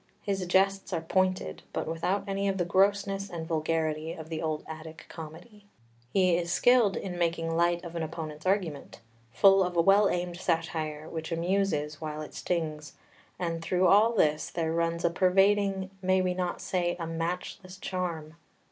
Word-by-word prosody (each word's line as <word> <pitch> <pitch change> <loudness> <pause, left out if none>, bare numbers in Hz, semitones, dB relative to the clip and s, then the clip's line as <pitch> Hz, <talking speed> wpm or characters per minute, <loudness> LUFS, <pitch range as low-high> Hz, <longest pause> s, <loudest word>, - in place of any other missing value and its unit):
His 195 -2 -1
jests 195 +2 +2
are 165 - 0
pointed, 185 - 0
but - - -2
without 165 +5 -1
any 195 0 -1
of 195 -1 0
the 175 - 0
grossness 195 +2 +1
and 165 -2 -5
vulgarity 160 0 -1
of 160 -1 -9
the 160 -1 -3
old 155 -1 -2
Attic 160 0 -9
comedy. 175 +7 -11 0.4
He 185 -3 +3
is 170 0 -2
skilled 240 0 +4
in 180 -2 -5
making 165 -1 0
light 170 0 +2
of 170 0 -8
an 165 - -2
opponent's 155 0 -5
argument, 185 -7 -1 0.3
full 195 - +6
of 180 -1 -3
a - - +6
well 195 +3 +5
aimed 175 -1 -2
satire 160 -3 -2
which 160 +1 -6
amuses 165 -4 0
while 155 -1 -4
it - - -10
stings; 155 -3 -3 0.4
and 165 -2 -2
through 180 +2 +1
all 210 +5 +5
this 155 -8 +2
there 165 -1 -2
runs 170 0 0
a 170 - +3
pervading, 195 +1 +2
may 185 0 +3
we 185 -1 +1
not 180 -1 -3
say, 175 -2 -1
a 165 - -3
matchless 175 +3 -4
charm. 170 -5 -4
175 Hz, 170 wpm, -29 LUFS, 160-190 Hz, 0.4 s, full